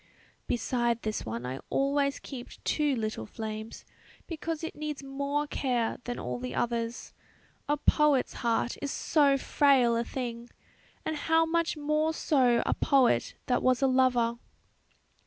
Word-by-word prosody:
"Beside 240 Hz, -1 st, 0 dB
this 215 Hz, -, -3 dB
one 115 Hz, +2 st, -4 dB
I 130 Hz, +2 st, -4 dB
always 280 Hz, 0 st, +1 dB
keep 255 Hz, -4 st, -8 dB
two 295 Hz, -3 st, +1 dB
little 215 Hz, -, -3 dB
flames, 220 Hz, -, -6 dB, 0.4 s
because 330 Hz, -1 st, -4 dB
it 325 Hz, -, -5 dB
needs 300 Hz, -2 st, -5 dB
more 280 Hz, +2 st, -2 dB
care 250 Hz, -5 st, -1 dB
than 245 Hz, -, -3 dB
all 125 Hz, 0 st, -4 dB
the 125 Hz, +1 st, -5 dB
others; 235 Hz, 0 st, -2 dB, 0.6 s
a 295 Hz, -, +2 dB
poet's 295 Hz, -2 st, +3 dB
heart 235 Hz, 0 st, 0 dB
is 285 Hz, -, -2 dB
so 280 Hz, -1 st, +3 dB
frail 265 Hz, -4 st, +3 dB
a 230 Hz, -, +1 dB
thing; 235 Hz, -1 st, -5 dB, 0.6 s
and 315 Hz, -, -1 dB
how 325 Hz, +2 st, +2 dB
much 335 Hz, 0 st, 0 dB
more 305 Hz, +2 st, 0 dB
so 250 Hz, -7 st, +3 dB
a -, -, +2 dB
poet 260 Hz, -, +2 dB
that 250 Hz, -, +1 dB
was 255 Hz, +1 st, +2 dB
a -, -, +5 dB
lover!" 250 Hz, -3 st, +2 dB
255 Hz, 145 wpm, -29 LUFS, 235-295 Hz, 0.6 s, a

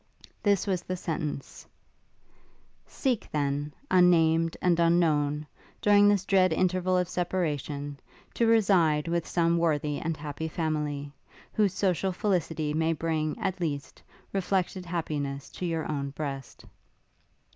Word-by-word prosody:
This 200 Hz, -3 st, +2 dB
was 185 Hz, -4 st, 0 dB
the 185 Hz, +1 st, -4 dB
sentence: 155 Hz, -5 st, -5 dB, 1.2 s
'Seek, 255 Hz, -6 st, -1 dB
then, 145 Hz, 0 st, -1 dB, 0.2 s
unnamed 165 Hz, -2 st, +4 dB
and 175 Hz, -2 st, +2 dB
unknown, 155 Hz, -3 st, +2 dB, 0.3 s
during 205 Hz, 0 st, +5 dB
this 200 Hz, -2 st, +3 dB
dread 185 Hz, -2 st, +4 dB
interval 185 Hz, +2 st, +1 dB
of 180 Hz, -1 st, +1 dB
separation, 150 Hz, -6 st, -2 dB, 0.3 s
to 230 Hz, -, +2 dB
reside 180 Hz, -9 st, +3 dB
with 170 Hz, -1 st, -1 dB
some 170 Hz, -1 st, +2 dB
worthy 150 Hz, -3 st, 0 dB
and 165 Hz, -1 st, -2 dB
happy 150 Hz, +1 st, -5 dB
family, 150 Hz, -3 st, -2 dB, 0.4 s
whose 200 Hz, -3 st, +2 dB
social 190 Hz, -1 st, +1 dB
felicity 170 Hz, -6 st, -1 dB
may 160 Hz, +1 st, +1 dB
bring, 155 Hz, -1 st, -1 dB
at 185 Hz, -1 st, -3 dB
least, 145 Hz, -4 st, -4 dB, 0.3 s
reflected 190 Hz, -1 st, -1 dB
happiness 145 Hz, -5 st, -3 dB
to 180 Hz, -, -4 dB
your 165 Hz, -1 st, -2 dB
own 140 Hz, -2 st, -2 dB
breast.' 140 Hz, -2 st, -6 dB
165 Hz, 125 wpm, -28 LUFS, 150-185 Hz, 1.2 s, during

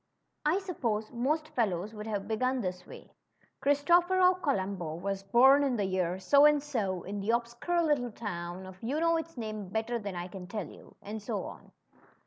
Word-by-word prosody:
I 325 Hz, +5 st, +3 dB
suppose 235 Hz, -, -2 dB
most 300 Hz, +6 st, -1 dB
fellows 205 Hz, -3 st, -1 dB
would 210 Hz, 0 st, -7 dB
have 205 Hz, -3 st, -3 dB
begun 255 Hz, +4 st, 0 dB
this 180 Hz, -2 st, -4 dB
way: -, -, -12 dB, 0.5 s
Christophero 350 Hz, +6 st, +4 dB
Columbo 190 Hz, -, -1 dB
was 195 Hz, +3 st, -3 dB
born 250 Hz, +8 st, +6 dB
in 270 Hz, -3 st, +1 dB
the 205 Hz, -3 st, 0 dB
year 185 Hz, -1 st, 0 dB
so 280 Hz, +10 st, +5 dB
and 295 Hz, -1 st, +5 dB
so, 205 Hz, -11 st, -2 dB
in 200 Hz, +2 st, -5 dB
the 200 Hz, +2 st, -4 dB
obscure 235 Hz, +9 st, 0 dB
little 280 Hz, -7 st, +1 dB
town 180 Hz, -4 st, -5 dB
of 185 Hz, 0 st, -12 dB
you 265 Hz, +7 st, -1 dB
know 335 Hz, 0 st, +3 dB
its 325 Hz, -2 st, -6 dB
name 215 Hz, -4 st, -5 dB
better 225 Hz, +3 st, -1 dB
than 200 Hz, -3 st, -5 dB
I 175 Hz, 0 st, -4 dB
can 180 Hz, -1 st, -9 dB
tell 205 Hz, -1 st, -4 dB
you," -, -, -15 dB
and 215 Hz, +2 st, -6 dB
so -, -, -3 dB
on. -, -, -10 dB
220 Hz, 185 wpm, -30 LUFS, 195-285 Hz, 0.5 s, born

